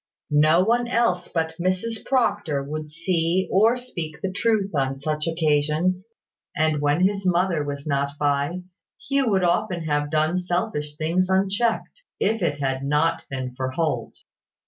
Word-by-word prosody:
No 155 +4 +5
one 240 +3 +2
else 230 -7 +1
but 160 -1 -2
Mrs 185 +6 -1
Proctor 205 - 0
would 150 +2 -5
see 170 +2 0
or 225 +5 +4
speak 170 -11 -6
the 190 - -1
truth 205 -1 0
on 135 -2 0
such 150 +2 -2
occasions; 160 +4 +1 0.5
and 155 -1 +1
when 145 +3 +2
his 200 0 -3
mother 180 -3 +1
was 140 -1 -5
not 140 -1 -1
by, 145 +5 0 0.4
Hugh 275 -3 +2
would 190 -3 +2
often 175 0 +1
have 145 -1 0
done 155 +3 +1
selfish 175 -4 -2
things 175 +4 0
unchecked, 200 - 0 0.2
if 220 +1 +1
it 150 -4 0
had 135 -1 -1
not 150 +4 +1
been 130 -2 -4
for 130 0 -2
Holt. 160 +3 -2
165 Hz, 150 wpm, -24 LUFS, 150-190 Hz, 0.5 s, No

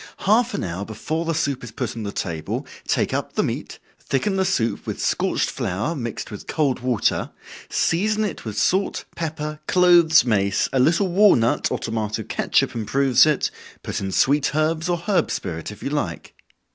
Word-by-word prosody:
Half 235 +5 +3
an - - -2
hour 90 +2 -4
before 155 +11 -3
the 165 0 -1
soup 140 -4 -1
is 120 - -7
put - - -4
on 115 - -5
the 100 -1 -4
table, 80 -6 -4 0.2
take - - +1
up - - -2
the - - +1
meat, - - -4 0.2
thicken 190 +9 -1
the 190 0 +1
soup 115 - -1
with - - -4
scorched - - 0
flour, 105 - -2
mixed 120 -6 -5
with 105 - -9
cold 145 -5 0
water, 125 -3 0 0.4
season 210 +6 +1
it 205 - -4
with 110 -3 -6
salt, 190 +2 +1
pepper, 155 -2 -4
cloves, 175 -4 +5
mace, 100 -4 +1
a 135 - +2
little 170 +8 +3
walnut, 175 - +4
or - - 0
tomato 110 -1 -3
catsup - - 0
improves 130 +5 +3
it, 150 -3 +1 0.3
put - - -3
in 95 0 -3
sweet 145 +7 +2
herbs 160 +2 0
or 175 - +1
herb 175 +3 0
spirit 80 -1 -4
if 105 - -11
you 140 - -3
like. 100 - -3
140 Hz, 180 wpm, -22 LUFS, 110-170 Hz, 0.4 s, cloves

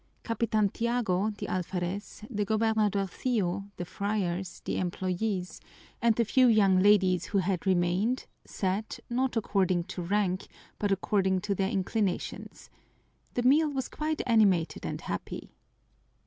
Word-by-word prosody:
Capitan 225 -2 +1
Tiago, 220 -4 0
the - - -4
alferez, 185 +3 -3
the 210 -4 -1
gobernadorcillo, 205 -2 0
the 175 - -4
friars, 190 -2 -2
the - - -1
employees, 185 +1 -2 0.4
and 230 -1 +4
the 235 - +2
few 255 +4 +4
young 200 -5 +5
ladies 190 -3 +4
who 205 - -1
had 190 0 0
remained 185 +7 +1 0.2
sat, 195 +3 -3
not 255 0 0
according 190 -5 +1
to 180 - -6
rank, 185 +1 0 0.3
but 205 -1 0
according 190 -1 +1
to 205 +1 -1
their 195 0 0
inclinations. 200 -1 -2 0.6
The 245 - 0
meal 300 +5 +5
was 270 -3 -3
quite 310 0 -2
animated 205 -9 +2
and - - -4
happy. - - -5
200 Hz, 130 wpm, -29 LUFS, 185-225 Hz, 0.6 s, young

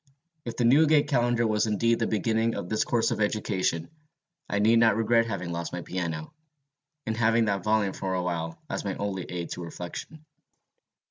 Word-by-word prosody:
If 115 -1 -5
the 120 - +2
Newgate 150 +4 +5
Calendar 120 -4 +2
was 110 0 +1
indeed 115 +2 +2
the 115 - +1
beginning 110 +1 0
of 90 - -5
this 110 - +1
course 115 -2 +1
of - - -2
education, 100 - -1 0.6
I 100 - 0
need 110 +3 +4
not 115 -3 +5
regret 115 +1 +2
having 90 -6 -4
lost 85 0 -4
my 90 -1 -4
piano, 85 - -4 0.7
and 110 - -2
having 115 0 +3
that 100 -2 -1
volume 105 -3 +1
for 95 -1 -3
a 90 - -1
while 80 -2 -3
as - - -3
my - - -3
only 95 -3 -3
aid 85 -1 -5
to - - -5
reflection. 90 - -8
110 Hz, 185 wpm, -27 LUFS, 90-115 Hz, 0.7 s, Newgate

